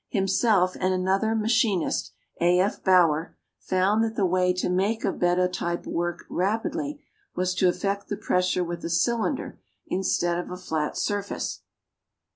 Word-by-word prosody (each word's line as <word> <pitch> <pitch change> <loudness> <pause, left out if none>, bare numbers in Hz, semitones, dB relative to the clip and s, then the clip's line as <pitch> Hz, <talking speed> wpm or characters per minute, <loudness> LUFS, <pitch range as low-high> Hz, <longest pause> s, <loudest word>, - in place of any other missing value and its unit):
Himself 195 -2 +2
and 185 0 +1
another 195 +4 +1
machinist, 220 -4 +1 0.3
A. 175 +1 +4
F. 195 +3 0
Bauer, 170 -4 +3 0.2
found 195 +4 +1
that 225 0 -2
the 200 - +2
way 180 0 +2
to 180 0 -1
make 195 +5 0
a - - +2
bed 175 0 +1
of 180 0 +2
type 170 -1 -3
work 175 0 -3
rapidly 280 - -2 0.3
was 185 0 0
to 185 0 +2
effect 200 +2 -2
the 205 - -3
pressure 180 0 +1
with 170 0 -5
a - - -3
cylinder 235 - 0 0.3
instead 175 -2 0
of 175 - -5
a 180 - -6
flat 160 -4 -3
surface. 205 -1 -2
185 Hz, 155 wpm, -26 LUFS, 180-210 Hz, 0.3 s, A